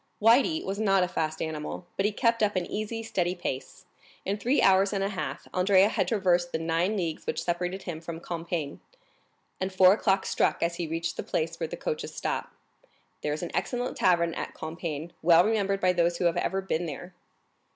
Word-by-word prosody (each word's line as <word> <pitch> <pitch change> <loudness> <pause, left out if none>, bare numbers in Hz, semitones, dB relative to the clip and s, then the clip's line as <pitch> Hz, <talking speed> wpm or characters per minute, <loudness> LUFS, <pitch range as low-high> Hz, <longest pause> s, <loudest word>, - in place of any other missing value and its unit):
Le 225 +2 +6
Blanc 320 +3 -2
was 195 +2 -3
not 195 -3 +3
a - - +1
fast 155 -3 -2
animal, 155 +2 -5
but 195 - +2
he - - -1
kept 230 +2 +1
up 210 -1 +2
an 180 -1 0
easy, 215 +3 -4
steady 180 -5 -1
pace; 175 +3 -5 0.4
in 195 - 0
three 245 +7 +1
hours 195 +1 +4
and 195 -1 0
a 195 - 0
half 155 -7 -5
Andrea 190 +2 +4
had 190 -5 0
traversed 180 -4 +2
the - - 0
nine 165 +6 0
leagues 165 -4 -3
which - - -1
separated 180 +2 -2
him 160 -3 -5
from 165 0 -6
Compiègne, 165 -3 -4 0.8
and 190 +1 -2
four 185 0 +7
o'clock 195 -2 +1
struck - - +1
as 170 0 -1
he 170 - -2
reached 165 +1 -3
the - - -1
place 165 +1 -2
where 165 - -1
the - - -6
coaches 475 -1 -4
stop. - - -3 0.7
There 150 - -1
is 155 +3 -3
an 175 - -4
excellent 245 0 -2
tavern 170 -2 +3
at - - -5
Compiègne, 160 0 -5
well 170 +1 +6
remembered 200 -3 +1
by 185 -1 +3
those 170 0 +2
who 175 - -1
have 170 - +2
ever 195 0 0
been 175 -2 -1
there. 175 +5 -7
180 Hz, 205 wpm, -28 LUFS, 165-195 Hz, 0.8 s, four